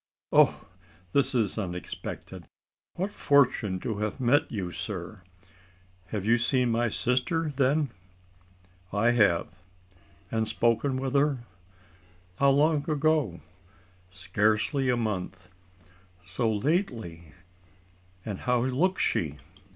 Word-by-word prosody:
"Oh! -, -, +4 dB, 0.5 s
this 140 Hz, +2 st, +4 dB
is 110 Hz, -3 st, 0 dB
unexpected 90 Hz, -3 st, -6 dB, 0.5 s
what 190 Hz, +4 st, -2 dB
fortune 125 Hz, -9 st, +2 dB
to 110 Hz, -3 st, -3 dB
have 105 Hz, +5 st, -3 dB
met 130 Hz, +3 st, +2 dB
you, 95 Hz, -5 st, -3 dB
sir! 90 Hz, +2 st, -6 dB, 0.9 s
You 105 Hz, -, -1 dB
have 120 Hz, -, +2 dB
seen 125 Hz, 0 st, +2 dB
my 120 Hz, +1 st, +1 dB
sister 130 Hz, -, 0 dB
then?" 140 Hz, +1 st, +1 dB, 1.0 s
"I 105 Hz, +4 st, +2 dB
have." 105 Hz, -8 st, +3 dB, 0.8 s
"And 110 Hz, -1 st, 0 dB
spoken 120 Hz, +4 st, +1 dB
with 130 Hz, 0 st, -3 dB
her? 140 Hz, -3 st, +1 dB, 0.9 s
How 140 Hz, -, +4 dB
long 145 Hz, +2 st, +2 dB
ago?" 150 Hz, -, +1 dB, 0.7 s
"Scarcely 105 Hz, -, 0 dB
a 125 Hz, -, +2 dB
month." 95 Hz, -4 st, -4 dB, 0.8 s
"So 105 Hz, +5 st, -1 dB
lately! 110 Hz, -, -2 dB, 0.9 s
And 100 Hz, -4 st, -4 dB
how 125 Hz, -1 st, +1 dB
looks 140 Hz, +10 st, +1 dB
she? 75 Hz, -4 st, 0 dB
120 Hz, 105 wpm, -27 LUFS, 105-140 Hz, 1.0 s, Oh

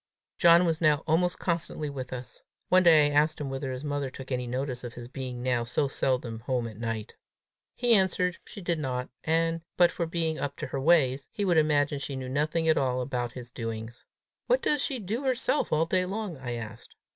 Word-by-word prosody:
John 170 Hz, 0 st, +7 dB
was 165 Hz, -1 st, 0 dB
now 155 Hz, -1 st, +3 dB
almost 175 Hz, +3 st, +2 dB
constantly 165 Hz, -3 st, -2 dB
with 135 Hz, -3 st, -6 dB
us. 125 Hz, -1 st, -7 dB, 0.3 s
One 185 Hz, 0 st, +6 dB
day 160 Hz, -4 st, +7 dB
I 145 Hz, -, +1 dB
asked 155 Hz, +2 st, +3 dB
him 140 Hz, -2 st, -4 dB
whether 135 Hz, 0 st, -3 dB
his 130 Hz, +2 st, -5 dB
mother 145 Hz, -2 st, -2 dB
took 135 Hz, +1 st, -10 dB
any 125 Hz, -1 st, -1 dB
notice 125 Hz, 0 st, -3 dB
of 120 Hz, 0 st, -7 dB
his 120 Hz, -1 st, -8 dB
being 125 Hz, -1 st, -6 dB
now 125 Hz, -2 st, +1 dB
so 125 Hz, +5 st, 0 dB
seldom 125 Hz, -4 st, -1 dB
home 125 Hz, 0 st, -1 dB
at 110 Hz, -2 st, -10 dB
night. 115 Hz, -2 st, -4 dB, 0.6 s
He 240 Hz, -1 st, +3 dB
answered 180 Hz, -3 st, +2 dB
she 200 Hz, -, -10 dB
did 170 Hz, -2 st, -1 dB
not; 125 Hz, -3 st, -3 dB
and, 165 Hz, +1 st, +1 dB, 0.2 s
but 175 Hz, -1 st, +6 dB
for 170 Hz, -, -2 dB
being 160 Hz, -1 st, -1 dB
up 140 Hz, 0 st, -3 dB
to 155 Hz, -, -5 dB
her 135 Hz, 0 st, -4 dB
ways, 140 Hz, -4 st, +3 dB
he 205 Hz, -, -2 dB
would 175 Hz, -3 st, +3 dB
imagine 145 Hz, -2 st, +2 dB
she 140 Hz, 0 st, -5 dB
knew 130 Hz, -1 st, -5 dB
nothing 155 Hz, +4 st, 0 dB
at 160 Hz, -, +4 dB
all 130 Hz, -2 st, 0 dB
about 125 Hz, -2 st, -2 dB
his 120 Hz, -1 st, -9 dB
doings. 115 Hz, -1 st, -6 dB, 0.4 s
"What -, -, +2 dB
does 295 Hz, -2 st, +2 dB
she 270 Hz, -, -1 dB
do 220 Hz, +4 st, -3 dB
herself 260 Hz, +2 st, 0 dB
all 155 Hz, +2 st, +3 dB
day 180 Hz, +2 st, +1 dB
long?" 200 Hz, -2 st, -4 dB
I 130 Hz, -3 st, -5 dB
asked. 115 Hz, -1 st, -8 dB
145 Hz, 215 wpm, -28 LUFS, 125-170 Hz, 0.6 s, John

